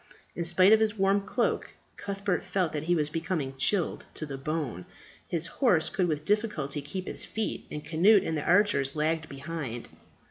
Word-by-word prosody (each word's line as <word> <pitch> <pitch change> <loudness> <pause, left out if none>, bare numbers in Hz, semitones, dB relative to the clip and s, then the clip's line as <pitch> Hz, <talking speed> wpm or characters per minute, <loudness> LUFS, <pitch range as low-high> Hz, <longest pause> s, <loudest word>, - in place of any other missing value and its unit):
In 170 - -2
spite 185 +4 +6
of 220 - +6
his 220 0 +1
warm 195 +1 +3
cloak 235 +3 -1 0.2
Cuthbert 195 -3 -2
felt 185 -5 -1
that 150 0 -3
he 175 +1 +2
was 150 -2 0
becoming 160 -4 -2
chilled 175 +6 0
to 155 - -3
the 140 -2 -6
bone. 135 - -4 0.4
His 170 -1 0
horse 180 - +2
could 185 -2 +1
with 150 -2 -2
difficulty 200 -10 -1
keep 185 +7 -5
his - - +3
feet; 220 -1 -4
and 150 - -6
Cnut 195 +6 +5
and 160 - -1
the 150 - -2
archers 180 -7 +3
lagged 160 +1 -1
behind. 140 -4 -6
165 Hz, 180 wpm, -28 LUFS, 150-195 Hz, 0.4 s, spite